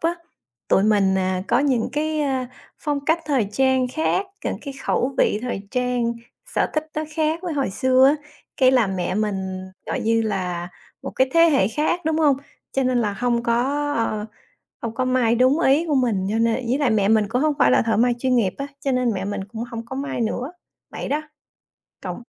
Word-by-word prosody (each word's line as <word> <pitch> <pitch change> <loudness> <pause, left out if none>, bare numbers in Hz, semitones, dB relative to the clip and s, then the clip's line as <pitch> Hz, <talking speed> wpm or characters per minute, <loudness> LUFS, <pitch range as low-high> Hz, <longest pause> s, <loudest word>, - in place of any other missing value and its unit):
á, 335 +1 +1 0.5
tụi 190 - +4
mình, 200 -3 +3
à, 185 0 -1
có 240 - +3
những 265 -5 +1
cái, 310 +1 -1
ơ, 265 -3 0 0.3
phong 290 -2 -2
cách 320 +2 +2
thời 255 -9 +1
trang 260 +1 +2
khác, 320 +7 0 0.2
những - - -1
cái 280 -2 -6
khẩu 265 +2 0
vị 210 - +3
thời 240 -5 -3
trang, 250 -2 0 0.4
sở - - +2
thích 310 0 -1
nó 310 - -1
khác 315 +1 +1
với 350 -3 -3
hồi 275 -8 -1
xưa 260 +4 +4
á. 285 - +5 0.4
Cái 260 -1 +5
là 250 -4 +3
mẹ 185 -1 -2
mình, 190 -3 -2 0.3
gọi - - -2
như 225 0 +2
là, 180 -5 -2 0.3
một 270 - -5
cái 260 0 +1
thế 330 - +6
hệ 270 -9 +3
khác, 300 +8 0
đúng 320 0 +1
hông? 290 -4 +4 0.4
Cho 270 - +1
nên 255 -1 +1
là 210 -3 0
hông 240 +2 0
có, 275 +5 0
ờ, 215 -4 -1 0.6
hông 230 -1 -4
có 255 +1 -1
may 250 -2 +2
đúng 260 +6 +3
ý 305 +2 +3
của 295 - +1
mình 215 -7 +1
cho 220 - 0
nên 230 0 +2
ý 250 +4 +1
là 285 -4 +2
mẹ 205 -3 +2
mình 215 -2 +3
cũng 250 +3 0
hông 310 -1 +2
phải 125 - +5
là - - +5
thợ 225 -2 0
may 240 +2 +3
chuyên 255 0 +1
nghiệp 200 -6 +2
á, 275 - -4
cho 275 - -1
nên 250 -2 +1
mẹ 190 0 -3
mình 205 -1 -3
cũng 225 +3 -6
hông 230 0 -5
có 265 - -7
may 275 -3 -3
nữa, 245 +6 -2 0.4
vậy - - -6
đó. 300 +2 0 0.8
Cộng - - -5
250 Hz, 215 wpm, -22 LUFS, 220-280 Hz, 0.8 s, thế